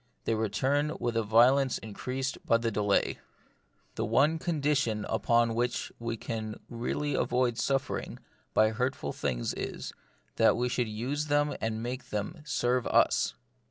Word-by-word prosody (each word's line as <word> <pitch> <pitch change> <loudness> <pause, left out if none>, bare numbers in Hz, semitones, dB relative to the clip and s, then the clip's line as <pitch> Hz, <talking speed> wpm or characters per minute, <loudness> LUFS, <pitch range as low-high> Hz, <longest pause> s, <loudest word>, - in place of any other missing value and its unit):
They - - 0
return 130 +8 0
with 120 -1 -1
a 115 - +3
violence 125 +5 +4
increased 130 +5 -4
by 115 - +4
the 115 0 -1
delay. 105 -1 +1 0.7
The 110 - -2
one 140 +9 +3
condition 145 - 0
upon 115 +1 +2
which 120 +1 -1
we 115 0 -3
can 110 -1 -5
really 125 +5 -2
avoid 125 -1 +1
suffering 135 -1 -1 0.4
by 110 0 +5
hurtful 125 - -2
things 60 -4 -2
is, - - -5 0.4
that - - +5
we 125 +1 0
should 125 -2 0
use 130 +8 -2
them 145 0 +2
and 110 0 -2
make 125 +2 -5
them 105 - -4
serve 125 -3 +1
us. - - +3
120 Hz, 145 wpm, -29 LUFS, 110-135 Hz, 0.7 s, by